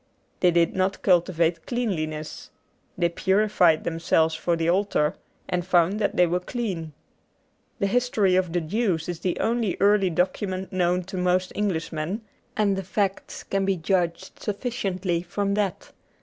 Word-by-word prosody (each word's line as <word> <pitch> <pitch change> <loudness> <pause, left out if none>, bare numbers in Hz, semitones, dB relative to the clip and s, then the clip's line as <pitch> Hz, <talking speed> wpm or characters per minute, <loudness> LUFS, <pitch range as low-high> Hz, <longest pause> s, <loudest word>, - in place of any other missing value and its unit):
They 180 - +4
did 170 -1 +2
not 190 +1 0
cultivate 170 -2 +2
cleanliness. 155 -11 -3 0.5
They 175 -1 +3
purified 190 -2 +2
themselves 165 -1 +1
for 170 +1 0
the 165 0 -1
altar, 180 -4 +2 0.3
and 180 -1 -1
found 180 +3 +2
that 205 - 0
they 180 - +6
were 175 +1 0
clean. 180 -6 -4 0.8
The - - 0
history 210 -3 +2
of 185 -2 +1
the 175 +1 0
Jews 180 -1 -1
is 175 -2 -4
the 180 -1 -2
only 230 -4 0
early 200 -1 +4
document 185 +2 -2
known 180 0 +1
to 190 +2 -7
most 180 0 +1
Englishmen, 170 -1 -2 0.4
and 205 -2 +2
the 195 - -3
facts 195 +1 -2
can 195 0 -1
be 195 -1 +1
judged 175 +1 -1
sufficiently 195 -6 -2
from 200 +3 -2
that. 200 -3 -2
185 Hz, 150 wpm, -25 LUFS, 170-200 Hz, 0.8 s, they